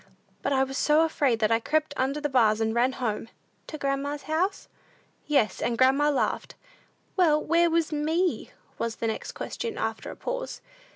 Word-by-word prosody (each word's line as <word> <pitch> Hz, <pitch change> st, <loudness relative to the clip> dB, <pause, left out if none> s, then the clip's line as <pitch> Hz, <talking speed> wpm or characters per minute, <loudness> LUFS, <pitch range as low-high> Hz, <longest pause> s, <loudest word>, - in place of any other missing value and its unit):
But 275 Hz, -, -1 dB
I 265 Hz, -1 st, +3 dB
was 270 Hz, 0 st, -3 dB
so 300 Hz, +1 st, +4 dB
afraid, 280 Hz, -7 st, +1 dB
that 215 Hz, 0 st, +2 dB
I 225 Hz, -, +4 dB
crept 305 Hz, +4 st, 0 dB
under 270 Hz, +3 st, 0 dB
the 295 Hz, -, -1 dB
bars, 225 Hz, -6 st, +3 dB
and 220 Hz, 0 st, 0 dB
ran 245 Hz, +3 st, +2 dB
home." 225 Hz, -4 st, -3 dB, 0.4 s
"To 310 Hz, -, -6 dB
grandma's 280 Hz, +1 st, -2 dB
house?" 355 Hz, +6 st, -1 dB, 0.6 s
"Yes; 255 Hz, -10 st, +2 dB
and 235 Hz, -1 st, 0 dB
grandma 270 Hz, +3 st, +4 dB
laughed." 285 Hz, -, -1 dB, 0.6 s
"Well, 320 Hz, -5 st, +4 dB
where 335 Hz, +2 st, +3 dB
was 330 Hz, -1 st, +1 dB
me?" 320 Hz, +4 st, 0 dB, 0.3 s
was 230 Hz, -1 st, -2 dB
the -, -, -4 dB
next 220 Hz, -, -3 dB
question, 460 Hz, -2 st, -5 dB
after 220 Hz, 0 st, -3 dB
a -, -, -7 dB
pause. -, -, -4 dB
285 Hz, 175 wpm, -27 LUFS, 240-310 Hz, 0.6 s, so